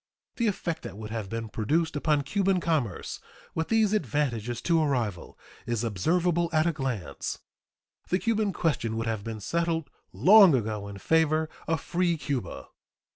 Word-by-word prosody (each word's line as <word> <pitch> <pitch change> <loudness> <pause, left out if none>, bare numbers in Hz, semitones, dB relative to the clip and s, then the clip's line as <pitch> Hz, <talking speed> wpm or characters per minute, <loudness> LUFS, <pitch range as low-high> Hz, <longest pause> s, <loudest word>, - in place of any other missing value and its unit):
The 235 - +1
effect 175 -5 -2
that - - -8
would 110 0 -7
have 110 -4 -4
been 115 +1 -4
produced 155 +10 0
upon 145 -1 +1
Cuban 195 +5 +1
commerce, 150 - -1 0.3
with 160 0 -1
these 220 -2 +3
advantages 125 - -1
to 165 -2 +3
a 155 - +2
rival, 115 -10 -2 0.3
is 120 -1 -1
observable 170 - +1
at 155 -1 +3
a 170 - +2
glance. 120 - -3 0.7
The 185 - +3
Cuban 215 -1 0
question 130 -11 -1
would 115 - -2
have 110 -3 -2
been 110 0 -5
settled 165 - -1 0.2
long 195 -5 +7
ago 105 -4 -2
in 100 -1 -8
favor 160 +5 +2 0.2
of 160 -2 0
"free 175 -1 0
Cuba." 135 - -4
150 Hz, 160 wpm, -27 LUFS, 115-170 Hz, 0.7 s, long